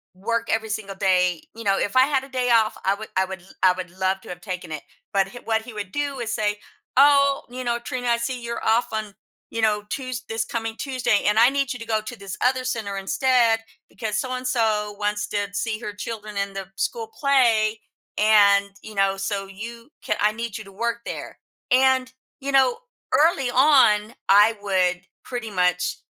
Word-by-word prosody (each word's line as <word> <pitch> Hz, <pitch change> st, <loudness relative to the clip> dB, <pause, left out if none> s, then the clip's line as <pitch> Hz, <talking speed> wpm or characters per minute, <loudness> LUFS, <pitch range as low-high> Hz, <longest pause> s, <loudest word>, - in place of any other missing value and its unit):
work 230 Hz, +4 st, -2 dB
every 225 Hz, 0 st, 0 dB
single 210 Hz, -2 st, -4 dB
day 180 Hz, -3 st, +2 dB
you 230 Hz, -, -8 dB
know, 195 Hz, -1 st, +2 dB
if 205 Hz, -, -2 dB
I 255 Hz, -, +7 dB
had 270 Hz, -1 st, +1 dB
a 270 Hz, -, -11 dB
day 250 Hz, -2 st, 0 dB
off, 220 Hz, -1 st, +3 dB
I 195 Hz, -, +4 dB
would 215 Hz, +2 st, -7 dB
I 190 Hz, -, +3 dB
would 190 Hz, -1 st, -7 dB
l 185 Hz, -, -20 dB, 0.2 s
I 185 Hz, -, +7 dB
would 180 Hz, -1 st, -6 dB
love 190 Hz, 0 st, 0 dB
to -, -, -13 dB
have 175 Hz, 0 st, -7 dB
taken 180 Hz, -3 st, -6 dB
it, 150 Hz, -2 st, -5 dB, 0.3 s
but 195 Hz, -1 st, +3 dB
h 245 Hz, -, -9 dB
what 220 Hz, -1 st, 0 dB
he 240 Hz, -, -10 dB
would 205 Hz, -3 st, -6 dB
do 285 Hz, -2 st, -2 dB
is 225 Hz, -2 st, -3 dB
say, 210 Hz, -2 st, 0 dB, 0.4 s
"Oh, 280 Hz, 0 st, +5 dB
you 255 Hz, +1 st, -6 dB
know, 235 Hz, 0 st, 0 dB
Trina, 245 Hz, 0 st, -4 dB
I 235 Hz, -, +3 dB
see 245 Hz, +2 st, -3 dB
you're 235 Hz, 0 st, -4 dB
off 225 Hz, +1 st, +2 dB
on, 215 Hz, -2 st, -4 dB, 0.3 s
you 230 Hz, -, -5 dB
know, 210 Hz, -1 st, +2 dB
Tues 255 Hz, -1 st, -4 dB
this 225 Hz, 0 st, -1 dB
coming 225 Hz, -1 st, -4 dB
Tuesday, 255 Hz, -6 st, 0 dB
and 210 Hz, +1 st, +3 dB
I 235 Hz, +3 st, +7 dB
need 275 Hz, -2 st, -1 dB
you 245 Hz, -, -8 dB
to 230 Hz, -, -7 dB
go -, -, +3 dB
to 230 Hz, +4 st, -8 dB
this 195 Hz, -1 st, -7 dB
other 255 Hz, 0 st, +2 dB
center 220 Hz, -6 st, -3 dB
instead 230 Hz, +3 st, +2 dB, 0.3 s
because 215 Hz, -3 st, -3 dB
so-and-so 230 Hz, -5 st, -1 dB
wants 210 Hz, 0 st, -1 dB
to 205 Hz, -1 st, -1 dB
see 215 Hz, +1 st, -2 dB
her 210 Hz, -3 st, -6 dB
children 210 Hz, 0 st, -6 dB
in 200 Hz, 0 st, -2 dB
the 195 Hz, -1 st, -6 dB
school 460 Hz, -, -2 dB
play, 230 Hz, -6 st, +3 dB, 0.4 s
and, 200 Hz, -2 st, +5 dB
you 220 Hz, -, -9 dB
know, 195 Hz, 0 st, +2 dB
so, 195 Hz, 0 st, -3 dB
you 230 Hz, +5 st, -9 dB, 0.2 s
ca -, -, +1 dB
I 210 Hz, +1 st, +4 dB
need 230 Hz, -1 st, -5 dB
you -, -, -8 dB
to 195 Hz, -, -13 dB
work 235 Hz, +4 st, -2 dB
there." -, -, -6 dB, 0.3 s
And, 260 Hz, 0 st, +3 dB, 0.3 s
you 280 Hz, 0 st, -3 dB
know, 265 Hz, -2 st, +4 dB, 0.4 s
early 295 Hz, -5 st, +3 dB
on, 245 Hz, -5 st, +4 dB, 0.2 s
I 210 Hz, +3 st, +6 dB
would 185 Hz, -3 st, +1 dB, 0.2 s
pretty 240 Hz, -3 st, -5 dB
much 180 Hz, -2 st, +1 dB
220 Hz, 205 wpm, -23 LUFS, 200-250 Hz, 0.4 s, I